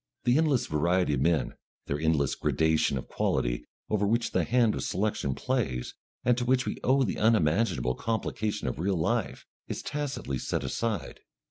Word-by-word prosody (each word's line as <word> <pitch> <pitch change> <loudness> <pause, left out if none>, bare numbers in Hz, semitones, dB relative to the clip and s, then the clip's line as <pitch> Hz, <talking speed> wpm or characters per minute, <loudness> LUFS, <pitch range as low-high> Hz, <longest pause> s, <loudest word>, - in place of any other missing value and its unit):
The 120 +4 +4
endless 150 -6 +2
variety 85 +2 +1
of 70 - 0
men, 80 +1 +1 0.3
their 70 - -2
endless 75 -3 +2
gradation 80 -3 +1
of 65 - -6
quality, - - -1 0.2
over 105 -1 +1
which 115 +2 +1
the - - +2
hand 120 -3 +3
of - - -3
selection 95 -9 -1
plays, 105 - -2 0.3
and 125 0 +4
to - - -1
which 130 +1 +2
we - - -3
owe 135 +1 +4
the 110 - -2
unmanageable 90 - +2
complication 110 - -2
of - - -3
real 95 +2 0
life, 80 - -1 0.2
is - - -5
tacitly 140 - -3
set - - -2
aside. 100 - -3
100 Hz, 165 wpm, -28 LUFS, 75-120 Hz, 0.3 s, The